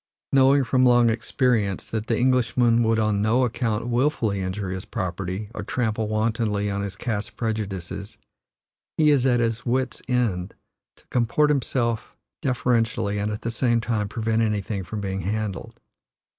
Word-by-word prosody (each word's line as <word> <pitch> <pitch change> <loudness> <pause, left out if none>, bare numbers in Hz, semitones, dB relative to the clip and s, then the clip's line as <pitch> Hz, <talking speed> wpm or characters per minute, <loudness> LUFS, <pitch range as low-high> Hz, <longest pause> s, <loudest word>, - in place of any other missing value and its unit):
Knowing, 135 +1 +5
from 130 +1 +2
long 120 -2 +5
experience, 110 -3 0
that 110 -1 -3
the 115 - +1
Englishman 120 -2 +3
would 115 -1 +2
on 105 -2 +1
no 115 +5 +3
account 115 -2 -1
wilfully 120 -5 +1
injure 95 +1 -3
his 95 0 -4
property 95 +3 -4
or - - -5
trample 110 0 -1
wantonly 110 -1 0
on 100 0 -2
his 100 -2 -4
caste 110 -1 -4
prejudices, 100 -4 -4 0.8
he 155 -1 +5
is 135 -3 +3
at 120 -2 +3
his 115 -1 0
wits' 130 +1 -1
end 110 -8 0 0.4
to - - -26
comport 125 +5 +2
himself 120 -5 -1 0.3
deferentially 115 -4 0
and 105 +1 -1
at 105 - -5
the 115 - -2
same 120 0 +1
time 110 -3 -1
prevent 110 0 0
anything 105 -2 -1
from 105 +3 -5
being 95 -1 -3
handled. 105 0 -4
110 Hz, 155 wpm, -24 LUFS, 105-120 Hz, 0.8 s, Knowing